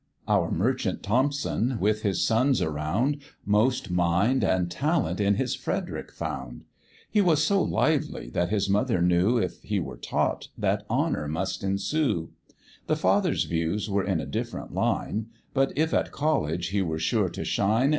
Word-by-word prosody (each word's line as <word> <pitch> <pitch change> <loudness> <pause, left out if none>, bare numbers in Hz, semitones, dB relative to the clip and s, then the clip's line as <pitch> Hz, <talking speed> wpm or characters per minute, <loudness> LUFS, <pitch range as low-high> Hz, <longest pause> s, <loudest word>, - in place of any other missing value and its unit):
Our - - +2
merchant 110 0 0
Thompson, 130 +1 0
with 105 +2 +1
his 100 -5 +1
sons 125 +4 +3
around, 90 - -1 0.2
Most 105 +1 +2
mind 90 +9 +2
and 90 -2 +1
talent 150 - 0
in 100 0 +3
his - - -1
Frederick - - -4
found: 65 -2 -6 0.5
He 210 - +4
was 160 -5 +3
so 195 +4 +3
lively, - - 0
that 85 0 0
his 105 -2 +1
mother 100 -2 +1
knew, 90 +7 +3
If 115 - -2
he 105 -2 -1
were 65 -8 -5
taught, - - -1
that - - 0
honour 75 0 0
must 90 +5 -3
ensue; 100 - 0 0.6
The - - +2
father's - - +2
views 85 +6 -1
were 100 0 +1
in 95 -4 0
a 75 - -3
different 70 - -4
line, 110 +1 -1 0.3
But 135 0 +2
if 160 +2 +1
at - - +1
college 90 - 0
he 100 +1 0
were 80 -4 -1
sure 90 +5 +1
to - - -5
shine. 110 +7 +2
100 Hz, 160 wpm, -26 LUFS, 85-130 Hz, 0.6 s, He